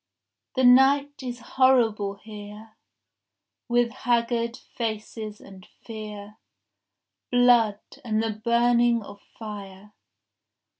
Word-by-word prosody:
— -, -, -60 dB
The 260 Hz, -, +1 dB
night 275 Hz, +3 st, +5 dB
is 245 Hz, -2 st, -5 dB
horrible 235 Hz, -6 st, +2 dB
here 210 Hz, +1 st, -11 dB, 0.9 s
With 240 Hz, -1 st, +2 dB
haggard 235 Hz, -1 st, -1 dB
faces 215 Hz, -1 st, -6 dB
and 190 Hz, -2 st, -14 dB, 0.2 s
fear, 210 Hz, -1 st, -9 dB, 0.9 s
Blood, 240 Hz, -4 st, +4 dB, 0.2 s
and 220 Hz, -2 st, 0 dB
the 225 Hz, -, -1 dB
burning 235 Hz, +1 st, +2 dB
of 200 Hz, 0 st, -12 dB, 0.2 s
fire. 205 Hz, -2 st, -9 dB
225 Hz, 95 wpm, -25 LUFS, 210-245 Hz, 0.9 s, night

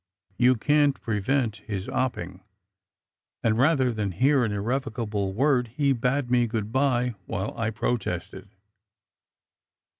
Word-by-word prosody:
You 125 Hz, +1 st, +5 dB
can 145 Hz, +4 st, +3 dB
t -, -, -24 dB
prevent 115 Hz, +1 st, -1 dB
his 100 Hz, -3 st, -5 dB
opping, 95 Hz, -9 st, -3 dB, 1.0 s
and 110 Hz, -1 st, +2 dB
rather 135 Hz, -3 st, +3 dB
than 105 Hz, -4 st, -2 dB
hear 135 Hz, -, +3 dB
an 110 Hz, -, 0 dB
irrevocable 110 Hz, -2 st, -2 dB
word 125 Hz, +3 st, +2 dB
he 140 Hz, -2 st, +3 dB
bade 125 Hz, +1 st, -1 dB
me 120 Hz, -1 st, +3 dB
good 110 Hz, -1 st, -3 dB
bye 125 Hz, -2 st, +1 dB
while 100 Hz, -2 st, -3 dB
I 115 Hz, -1 st, -1 dB
protested. 100 Hz, -4 st, -3 dB
120 Hz, 125 wpm, -26 LUFS, 105-135 Hz, 1.0 s, You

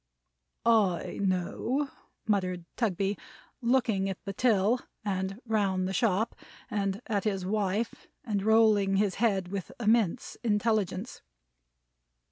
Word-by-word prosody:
"I 210 Hz, -7 st, +2 dB
know," 200 Hz, +9 st, 0 dB, 0.3 s
muttered 185 Hz, -4 st, 0 dB
Mr. -, -, -22 dB
Tugby, 200 Hz, -3 st, 0 dB, 0.4 s
looking 235 Hz, -6 st, +2 dB
at 190 Hz, -, -3 dB
the 195 Hz, -, -3 dB
till, 225 Hz, +1 st, +3 dB, 0.3 s
and 190 Hz, 0 st, -2 dB
round 195 Hz, -5 st, +1 dB
the 190 Hz, -, -3 dB
shop, 215 Hz, +1 st, +1 dB, 0.4 s
and 200 Hz, +2 st, -1 dB
at 205 Hz, -4 st, -1 dB
his 195 Hz, -4 st, -1 dB
wife; 205 Hz, +2 st, -1 dB, 0.2 s
and 210 Hz, -6 st, -1 dB
rolling 215 Hz, -2 st, +4 dB
his 195 Hz, -1 st, +2 dB
head 195 Hz, -6 st, +2 dB
with 195 Hz, -2 st, -4 dB
immense 220 Hz, -5 st, +1 dB
intelligence. 215 Hz, -1 st, 0 dB
205 Hz, 115 wpm, -29 LUFS, 190-225 Hz, 0.4 s, rolling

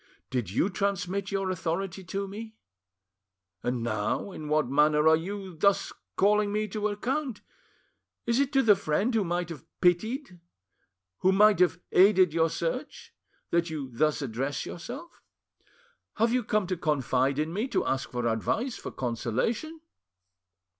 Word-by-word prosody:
Did 125 Hz, -8 st, -1 dB
you 105 Hz, -, +1 dB
transmit 195 Hz, 0 st, -1 dB
your 195 Hz, -1 st, -1 dB
authority 185 Hz, +2 st, -3 dB
to 195 Hz, +2 st, -3 dB
me? 220 Hz, +3 st, -8 dB, 1.1 s
And 125 Hz, -1 st, -2 dB
now, 120 Hz, -, -1 dB
in 155 Hz, -4 st, -7 dB
what 150 Hz, -2 st, +2 dB
manner 150 Hz, +3 st, +3 dB
are 160 Hz, -, +7 dB
you 190 Hz, +2 st, -5 dB
thus 200 Hz, +5 st, +2 dB, 0.2 s
calling 210 Hz, +1 st, +3 dB
me 215 Hz, +1 st, 0 dB
to 210 Hz, +2 st, -1 dB
account? 250 Hz, +4 st, -2 dB, 0.8 s
Is 235 Hz, +1 st, +2 dB
it 280 Hz, -1 st, +1 dB
to 270 Hz, -1 st, +4 dB
the 210 Hz, -2 st, +6 dB
friend 195 Hz, +6 st, 0 dB
who 220 Hz, -2 st, +2 dB
might 175 Hz, -1 st, -2 dB
have 160 Hz, -6 st, -8 dB, 0.2 s
pitied, 190 Hz, -, +1 dB, 0.8 s
who 190 Hz, -, +4 dB
might 210 Hz, +1 st, +5 dB
have 180 Hz, -2 st, +3 dB
aided 185 Hz, -3 st, +5 dB
your 165 Hz, 0 st, +3 dB
search, 210 Hz, -, -4 dB, 0.4 s
that 170 Hz, 0 st, +2 dB
you 145 Hz, -5 st, -5 dB
thus 150 Hz, +3 st, +1 dB
address 135 Hz, +3 st, -3 dB
yourself? 260 Hz, -, -8 dB, 0.9 s
Have 230 Hz, +2 st, +2 dB
you 250 Hz, -1 st, +2 dB
come 210 Hz, -1 st, +1 dB
to 185 Hz, 0 st, -2 dB
confide 135 Hz, -3 st, +1 dB
in 155 Hz, +2 st, -1 dB
me, 215 Hz, +7 st, -1 dB
to -, -, 0 dB
ask 135 Hz, 0 st, -1 dB
for 120 Hz, -1 st, -3 dB
advice, 220 Hz, -, -1 dB
for -, -, -6 dB
consolation? 130 Hz, -, -2 dB
185 Hz, 150 wpm, -28 LUFS, 150-210 Hz, 1.1 s, are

